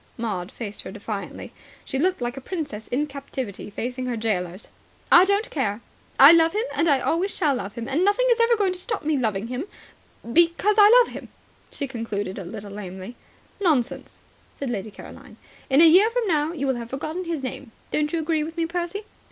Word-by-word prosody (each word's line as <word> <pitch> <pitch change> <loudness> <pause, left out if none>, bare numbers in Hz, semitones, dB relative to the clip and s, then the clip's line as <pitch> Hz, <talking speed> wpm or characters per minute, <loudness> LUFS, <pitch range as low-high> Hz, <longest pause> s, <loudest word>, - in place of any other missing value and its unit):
Maud 200 -6 -3
faced 210 -3 -7
her - - -8
defiantly. - - -6 0.3
She 265 - -3
looked 365 -1 +1
like 240 +1 -2
a 270 - -7
princess 285 - -5
in 280 +5 0
captivity 270 -8 -6
facing 250 +4 -4
her 240 -2 -2
gaolers. 190 -4 -3 0.4
"I 350 +2 +8
don't 400 +3 0
care. 215 -8 -1 0.4
I 275 +3 +11
love 330 -1 +5
him, 430 +2 0
and 335 - +1
I 280 -4 +4
always 355 +5 0
shall 305 -7 +1
love 205 -6 -4
him, 235 0 -5
and 285 +6 +1
nothing 410 +6 +3
is 470 - +3
ever 465 0 +4
going 390 -3 +1
to 365 - -8
stop 420 -2 -4
me 310 0 +1
loving 220 -6 -1
him 250 +7 -4 0.7
because 345 +5 +3
I 410 0 +9
love - - +4
him," - - -9 0.4
she 280 - -4
concluded 215 -6 -4
a - - -6
little 205 +2 -8
lamely. 195 +2 -8 0.4
"Nonsense," 305 - -1 0.4
said 275 -3 -3
Lady 205 -2 -4
Caroline. 205 - -13 0.3
"In 275 +3 +5
a 335 - +9
year 375 +7 +6
from 480 0 -1
now 310 -4 +1
you 290 -5 -3
will 265 -2 0
have 235 -1 -7
forgotten 310 +7 -4
his 330 -5 -3
name. 255 -1 -6 0.2
Don't 300 0 0
you 335 - -1
agree 315 -1 0
with 325 +2 -7
me, 335 - +1
Percy?" 350 +4 -3
280 Hz, 205 wpm, -24 LUFS, 230-345 Hz, 0.7 s, I